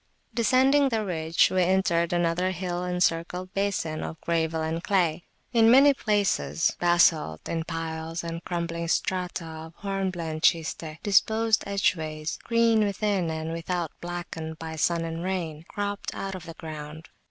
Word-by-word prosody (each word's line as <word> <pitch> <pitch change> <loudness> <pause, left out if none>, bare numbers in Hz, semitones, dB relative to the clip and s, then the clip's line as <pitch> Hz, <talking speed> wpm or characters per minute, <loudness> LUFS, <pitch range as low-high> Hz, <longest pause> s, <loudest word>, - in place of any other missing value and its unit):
Descending 265 +4 +4
the 220 -3 -1
ridge, 165 -3 +2
we 185 - +2
entered 175 -2 +2
another 175 +1 +1
hill 180 -1 -3
encircled 180 +1 -1
basin 195 -6 -1
of 160 - -6
gravel 160 -1 0
and 165 +2 -2
clay. 175 -4 +1 0.3
In 225 -1 +6
many 275 +4 +7
places 205 -8 +1
basalt 170 - +3
in 165 -1 -2
piles 165 0 -4
and 165 0 -5
crumbling 170 -1 -3
strata 180 0 -1
of 160 0 -9
hornblende 185 -5 -3
schiste, 160 -2 +1
disposed 220 +2 +3
edgeways, 160 -6 -1
green 230 -2 +3
within, 200 -3 0
and 160 0 -3
without 165 -1 -2
blackened 170 -2 -5
by 160 0 -6
sun 165 +1 +1
and 165 +1 -4
rain, 170 -4 -3
cropped 205 0 -4
out 195 0 -4
of 185 -3 -8
the 165 - -8
ground. 155 0 -8
175 Hz, 140 wpm, -26 LUFS, 160-195 Hz, 0.3 s, many